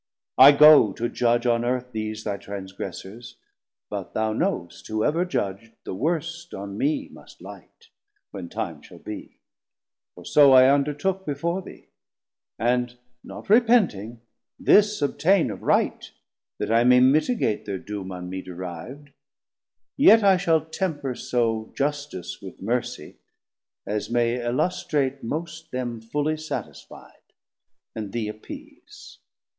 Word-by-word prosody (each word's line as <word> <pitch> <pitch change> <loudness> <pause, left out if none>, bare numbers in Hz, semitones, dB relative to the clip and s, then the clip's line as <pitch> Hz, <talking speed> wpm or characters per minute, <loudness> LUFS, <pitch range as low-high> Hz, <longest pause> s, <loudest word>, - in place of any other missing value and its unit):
I 135 +2 +11
go 145 -7 +7
to 120 - -2
judge 120 0 +1
On 120 -1 +2
Earth 125 +1 -2
these 110 -1 -4
thy 100 -2 -3
transgressors, 100 +3 -8 0.5
but - - -7
thou 110 0 0
knowst, 110 - -3
Whoever 150 +11 0
judg'd, 115 - -4
the - - -6
worst 165 - -3
on 100 0 -7
mee 145 +8 -1
must - - -16
light, 460 - -14 0.4
When - - -7
time - - -5
shall - - -14
be, - - -9 0.8
for - - -13
so 140 -2 +6
I 130 0 +8
undertook 150 +7 -1
Before 170 +4 -2
thee; - - -13 0.7
and 125 +1 0 0.3
not - - -10
repenting, 200 - +3 0.4
this 210 -5 +4
obtaine 165 - +2
Of 95 - -8
right, - - 0 0.5
that - - -3
I 115 +1 +4
may 125 +1 +6
mitigate 140 - +2
thir 100 -2 -3
doom 100 -1 -7
On 90 -1 -7
me 95 +1 -5
deriv'd, 90 - -9 0.9
yet 225 -6 +7
I 195 -1 +6
shall 165 -4 +1
temper 160 -5 -3
so 115 -3 -1
Justice 140 -11 -3
with 95 -2 -10
Mercie, 120 -2 -3 0.7
as 105 +1 -3
may 120 0 0
illustrate 135 +1 -1
most 160 +5 -5
Them 120 -4 -4
fully 150 +7 -2
satisfied, 155 0 -9 0.6
and 105 -3 -6
thee 115 -3 -2
appease. 110 0 -12
125 Hz, 130 wpm, -24 LUFS, 110-155 Hz, 0.9 s, I